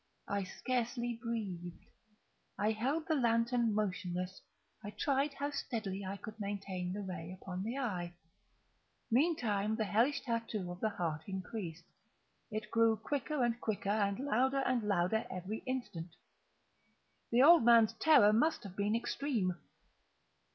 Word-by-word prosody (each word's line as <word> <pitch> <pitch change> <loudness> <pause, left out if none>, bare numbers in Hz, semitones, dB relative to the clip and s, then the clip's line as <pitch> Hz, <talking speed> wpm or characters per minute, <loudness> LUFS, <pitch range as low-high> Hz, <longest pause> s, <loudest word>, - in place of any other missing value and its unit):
I 200 -1 -1
scarcely 240 +2 -2
breathed. 195 -8 -4 0.8
I 210 +2 +2
held 270 +9 -1
the 320 - +2
lantern 235 -3 +2
motionless. 185 -3 -2 0.4
I 205 - -5
tried 275 +7 0
how 285 +1 -2
steadily 210 -8 -3
I 195 +1 -4
could 215 +2 -9
maintain 195 -3 -3
the 205 +2 -4
ray 185 -1 -6
upon 185 -1 -5
the 225 +5 -3
eve. 185 -10 -2 1.0
Meantime 225 - +2
the 220 - 0
hellish 245 +7 +2
tattoo 230 -6 -2
of 175 - -8
the 220 - +1
heart 160 -6 -3
increased. 190 -3 -5 0.6
It 215 -1 -5
grew 230 -1 +4
quicker 285 +1 -1
and 240 0 0
quicker, 200 -2 -1
and 200 -2 +1
louder 270 0 +2
and 255 -2 +2
louder 205 +1 +1
every 185 +4 -4
instant. 180 -10 -4 1.1
The 240 +2 +5
old 335 -1 +8
man's 230 -2 +6
terror 255 -10 +6
must 305 +9 +2
have 195 -3 -9
been 205 +2 +1
extreme! 230 -6 -1
220 Hz, 135 wpm, -34 LUFS, 190-245 Hz, 1.1 s, old